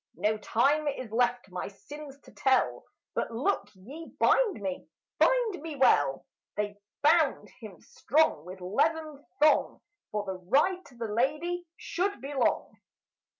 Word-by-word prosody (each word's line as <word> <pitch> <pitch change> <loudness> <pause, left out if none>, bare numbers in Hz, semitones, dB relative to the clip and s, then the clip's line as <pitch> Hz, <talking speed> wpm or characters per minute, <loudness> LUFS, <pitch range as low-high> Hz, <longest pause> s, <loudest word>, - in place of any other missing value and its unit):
No 210 +6 +1
time 285 +8 +2
is 255 -5 -3
left 245 -2 0
my 180 - -4
sins 280 +7 -11
to - - -17
tell; 265 -1 +1 0.3
But - - -1
look 235 - -1
ye 275 - -10
bind 450 - +3
me, 190 -2 -4 0.3
bind 480 -8 +3
me 315 -1 -6
well!" 145 - +3 0.3
They 205 -1 -2 0.2
bound 310 -1 +3
him 215 -7 -10
strong 295 - +1
with 185 +2 -10
leathern 305 - 0 0.2
thong, 300 +1 +3 0.3
For 210 -1 -2
the 190 -1 -5
ride 295 - +2
to 250 - -17
the 235 -1 -4
lady 305 +11 -1
should 385 -2 -2
be 275 +4 -6
long. 265 -3 0
265 Hz, 145 wpm, -29 LUFS, 210-315 Hz, 0.3 s, bind